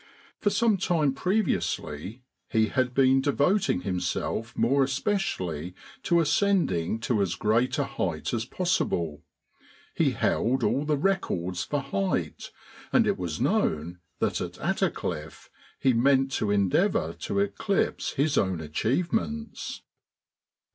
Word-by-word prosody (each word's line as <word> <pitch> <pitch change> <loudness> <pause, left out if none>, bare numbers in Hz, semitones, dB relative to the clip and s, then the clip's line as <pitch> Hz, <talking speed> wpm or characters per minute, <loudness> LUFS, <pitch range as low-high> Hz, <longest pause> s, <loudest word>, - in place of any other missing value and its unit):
For 205 - +2
some 210 +1 +2
time 165 -7 +1
previously 130 - -1 0.3
he 110 -2 +2
had 125 +1 0
been 135 0 +5
devoting 145 - +2
himself 95 +4 -2
more 135 +5 +3
especially 110 - -2 0.3
to 170 -2 +2
ascending 165 - +1
to 115 -2 +1
as 95 -3 0
great 115 +7 +1
a 145 - +2
height 95 - -3
as 115 -2 0
possible. 90 - -1 0.7
He - - +2
held 125 +2 +1
all 140 +5 +1
the 150 -1 +1
records 95 - -1
for 145 -1 -2
height, 100 -9 -2 0.4
and - - +4
it - - 0
was 85 -4 -3
known 85 +4 0 0.2
that - - 0
at - - -4
Attercliffe 75 +1 -3 0.3
he 130 - +3
meant 135 +3 +3
to 110 - -1
endeavour 105 - +2
to - - -3
eclipse 200 0 0
his 145 +1 +2
own 95 -4 0
achievements. 175 - -2
130 Hz, 125 wpm, -27 LUFS, -, 0.7 s, been